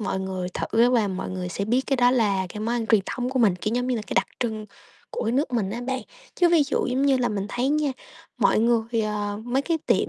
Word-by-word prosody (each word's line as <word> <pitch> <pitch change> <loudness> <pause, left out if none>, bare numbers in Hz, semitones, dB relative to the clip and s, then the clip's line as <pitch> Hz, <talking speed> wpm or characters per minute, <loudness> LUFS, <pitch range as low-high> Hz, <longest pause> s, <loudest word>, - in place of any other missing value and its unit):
mọi 190 -2 -2
người 185 -1 -3
thử 235 +2 +2
và 225 -5 +2
mọi 190 -1 -4
người 185 -1 -4
sẽ 200 +3 -3
biết 240 +4 +2
cái 270 - +1
đó 245 0 +4
là 205 -7 +1
cái 210 - -7
món 230 +2 -1
ăn 235 -2 -2
truyền 220 -2 +4
thống 250 0 -3
của 260 - -1
mình, 215 -7 +4
kiểu, 215 +5 -2
giống 245 0 0
như 255 -2 0
là 220 - -3
cái - - -5
đặc 190 - +3
trưng 220 -3 -2 0.4
của - - -3
cái 225 - 0
nước 270 0 0
mình 210 -5 0
á 235 - -4
bạn. 260 0 -1 0.3
Chứ 350 -1 +4
ví 335 -3 +5
dụ 285 - -1
giống 255 +2 0
như 280 -1 +4
là 245 -1 +1
mình 200 -2 -3
thấy 245 +4 -1
nha, 295 -2 +1 0.5
mọi - - +3
người, 230 0 +1
ờ 210 -1 -2
mấy 255 +3 0
cái 330 0 0
tiệm, - - +2
235 Hz, 275 wpm, -24 LUFS, 205-255 Hz, 0.5 s, ví